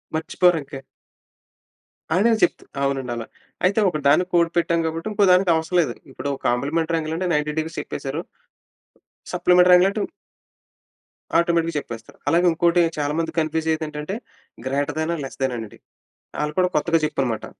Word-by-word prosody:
మర్చిపోరు 170 +2 +2
ఇంక. 135 -1 -9 1.3
అయినా 205 +7 +4
చెప్తుంది. - - 0
అవునండి 135 -3 -1
అలా. 115 -1 -5 0.4
అయితే 200 +4 +2
ఒక 155 - -3
దానికి 180 +6 +4
కోడ్ 170 -1 +4
పెట్టాం 170 0 +2
కాబట్టి, 165 +5 -3
ఇంకోదానికి 190 -3 +4
అవసరం 160 +3 -1
లేదు. 125 -7 -2 0.2
ఇప్పుడు 140 - -5 0.2
కాంప్లిమెంటరీ 160 +7 0
యాంగిల్ 155 0 -3
అంటే 185 - -1
90 150 0 0
డిగ్రీస్ 160 0 -5
చెప్పేసారు. 145 +6 -5 1.1
సప్లిమెంటరీ 180 0 +5
యాంగిల్ 180 +2 +5
అంటే... 210 0 -2 1.3
ఆటోమేటిక్‌గా 170 -1 +1
చెప్పేస్తారు. 115 -4 -10
అలాగే 175 +2 +3
ఇంకోటి 170 +1 +3 0.2
చాలా 145 0 -1
మంది 165 0 -1
కన్‌ఫ్యూజ్ 160 0 -1
అయ్యేది 160 0 0
ఏంటంటే, 150 +5 -5 0.5
గ్రేటర్ 140 +3 -1
థాన్, 160 +2 0
లెస్ 135 - -8
థాన్ 130 -1 +1
అనేది. 110 -2 -8 0.6
వాళ్ళకి 150 0 -2
కూడా 180 0 +4
కొత్తగా 165 +2 +2
చెప్పామనమాట. 130 -7 -2
160 Hz, 145 wpm, -22 LUFS, 145-175 Hz, 1.3 s, సప్లిమెంటరీ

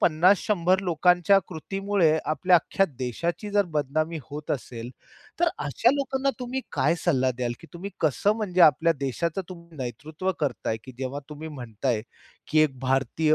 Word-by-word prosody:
50-100 185 +2 +3
लोकांच्या 180 +2 +4
कृतीमुळे 185 -1 +1
आपल्या 180 +3 +4
अख्ख्या 195 +4 +1
देशाची 170 - -3
जर 205 0 +3
बदनामी 155 +3 0
होत 145 +3 -8
असेल. 120 -3 -5 0.5
तर 345 - +5 0.2
अशा 225 - +3
लोकांना 275 -1 0
तुम्ही 255 +2 -3
काय 145 +4 +2
सल्ला 130 -7 +3
द्याल? 120 -1 -1
की 165 - -13
तुम्ही 185 +4 -6
कसं 160 - +2
म्हणजे 185 -5 -1
आपल्या 160 +2 +6
देशाचं 155 +7 -1
तुम्ही 170 -2 -12
नेतृत्व 150 +9 -3
करताय 140 -6 -1
की 130 - -10
जेव्हा 135 +2 -3
तुम्ही 155 +2 -7
म्हणताय, 120 -4 -3 0.5
की 155 0 +4
एक 135 -4 0
भारतीय 135 +4 +2
160 Hz, 150 wpm, -26 LUFS, 135-185 Hz, 0.5 s, आपल्या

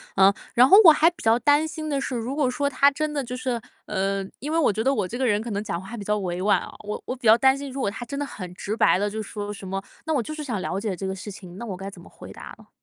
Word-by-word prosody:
呃， 195 +1 +6 0.2
然 250 +2 +7
后 390 - +8
我 325 - +12
还 305 +1 +4
比 345 - -14
较 225 +1 +4
担 295 +3 +3
心 310 0 -6
的 280 -2 0
是， 265 - -3
如 240 +4 -3
果 280 -4 +1
说 280 +3 -1
他 280 0 +5
真 305 +1 -2
的 285 -2 -1
就 250 +1 -6
是 250 -3 -2 0.2
呃， 195 -1 -1
因 295 +4 -5
为 325 - +1
我 315 -9 +3
觉 220 - -2
得 270 +3 +3
我 205 -7 -1
这 235 - -5
个 265 - +1
人 205 -2 +2
可 235 +1 -6
能 205 0 -2
讲 195 -5 -3
话 190 - -11
还 235 - -7
比 205 - -6
较 210 +1 0
委 180 -2 -3
婉 205 +2 +3
啊， - - -9
我 210 0 -4
我 255 - -3
比 250 - -12
较 220 +2 +8
担 265 +2 +4
心 280 -1 -6
如 270 - -6
果 200 - +1
他 225 - -7
真 280 +3 -5
的 290 - -1
很 185 -9 -8
直 205 +3 -4
白 - - +4
地 205 - 0
就 220 +1 -4
说 205 0 -6
什 195 -1 -9
么， 195 +1 -3 0.2
那 320 - 0
我 280 - +2
就 310 - -6
是 305 0 -6
想 240 -8 -3
了 190 - -2
解 205 -2 -2
这 195 - -6
个 190 - -3
事 205 +2 -8
情， 185 -3 -11
那 235 - -6
我 200 -5 -5
该 195 +1 -6
怎 180 - -13
么 - - -15
回 - - -12
答 - - -10
啊？ - - -19
230 Hz, 360 characters per minute, -24 LUFS, 200-275 Hz, 0.2 s, 我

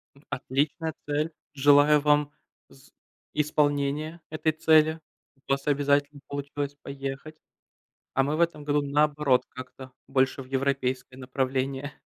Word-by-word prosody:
М, 140 - -21
отличная 150 +6 -1
цель. 150 +2 -1 0.2
Желаю 145 +2 +6
вам 150 0 +3 0.4
з - - -19 0.4
исполнения 150 +1 0
этой 155 0 0
цели. 155 0 +4 0.5
У - - -2
вас 140 +2 -3
обязательно 145 0 +1
получилось 145 0 -4
поехать. 140 +2 -6 0.8
А 135 - +4
мы 150 +2 -1
в 170 - -2
этом 165 -3 +1
году, 145 0 +1
наоборот, 145 -2 +2
как-то 130 0 -10 0.2
больше 135 0 +1
в - - -14
европейское 130 -1 -1
направление. 135 +2 -2
145 Hz, 125 wpm, -27 LUFS, 135-150 Hz, 0.8 s, Желаю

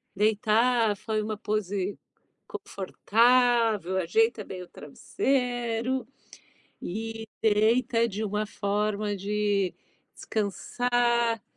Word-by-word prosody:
deitar 220 +1 +2
foi 215 +1 -2
uma 215 -1 -4
pose 205 -2 -2 0.5
confortável, 230 - +2
ajeita 215 +5 +1
bem 185 -1 -7
o 180 - -13
travesseiro 245 - -2 0.8
e 225 +3 -5 0.2
deita 230 +2 +3
de 205 +1 -4
uma 210 +1 -1
forma 205 0 -1
de 200 -1 0 0.4
descansar. 235 +2 0
215 Hz, 85 wpm, -27 LUFS, 205-235 Hz, 0.8 s, deita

